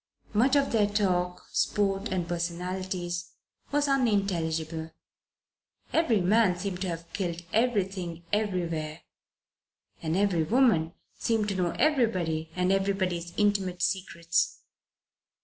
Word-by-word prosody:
Much 255 Hz, +6 st, +4 dB
of 280 Hz, -1 st, +3 dB
their 215 Hz, -3 st, +3 dB
talk, 180 Hz, -4 st, 0 dB
sport 195 Hz, 0 st, +1 dB
and 180 Hz, -2 st, -1 dB
personalities, 175 Hz, +1 st, -3 dB, 0.4 s
was 290 Hz, 0 st, +2 dB
unintelligible; 170 Hz, -, 0 dB, 1.0 s
every 245 Hz, -10 st, +3 dB
man 190 Hz, 0 st, +3 dB
seemed 185 Hz, -1 st, -4 dB
to 190 Hz, -, -1 dB
have 170 Hz, -1 st, -4 dB
killed 175 Hz, -3 st, -3 dB
everything 195 Hz, -7 st, 0 dB
everywhere 170 Hz, -7 st, -1 dB, 1.0 s
and 160 Hz, +1 st, -1 dB
every 195 Hz, -4 st, +2 dB
woman 170 Hz, -4 st, +3 dB, 0.2 s
seemed 225 Hz, -3 st, +1 dB
to 200 Hz, -, -1 dB
know 180 Hz, -2 st, +1 dB
everybody 185 Hz, -, +1 dB
and 180 Hz, +1 st, +2 dB
everybody's 190 Hz, -3 st, 0 dB
intimate 195 Hz, -4 st, +1 dB
secrets. 170 Hz, -3 st, 0 dB
185 Hz, 110 wpm, -28 LUFS, 170-210 Hz, 1.0 s, Much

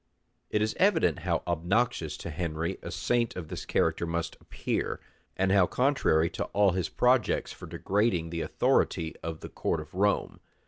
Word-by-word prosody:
It 105 Hz, -, +1 dB
is 110 Hz, -, -1 dB
evident 185 Hz, -, +3 dB
how 85 Hz, 0 st, -1 dB
obnoxious 90 Hz, +8 st, 0 dB
to 85 Hz, -, -6 dB
Henry 85 Hz, +2 st, -3 dB
a -, -, -6 dB
saint 120 Hz, -2 st, 0 dB
of 85 Hz, -4 st, -6 dB
this -, -, -6 dB
character 85 Hz, -, +1 dB
must 85 Hz, 0 st, -2 dB
appear, -, -, -3 dB, 0.4 s
and 95 Hz, 0 st, +2 dB
how 95 Hz, -3 st, +5 dB
contrary 125 Hz, -, +2 dB
to -, -, -3 dB
all 100 Hz, -1 st, +3 dB
his 90 Hz, -1 st, -1 dB
projects 125 Hz, -1 st, +2 dB
for -, -, -10 dB
degrading 95 Hz, -5 st, 0 dB
the 85 Hz, -1 st, -2 dB
authority 80 Hz, 0 st, +1 dB
of 80 Hz, -1 st, -5 dB
the -, -, -7 dB
court 80 Hz, -, -1 dB
of 75 Hz, 0 st, -10 dB
Rome. 100 Hz, +2 st, +1 dB
90 Hz, 170 wpm, -29 LUFS, 85-110 Hz, 0.4 s, how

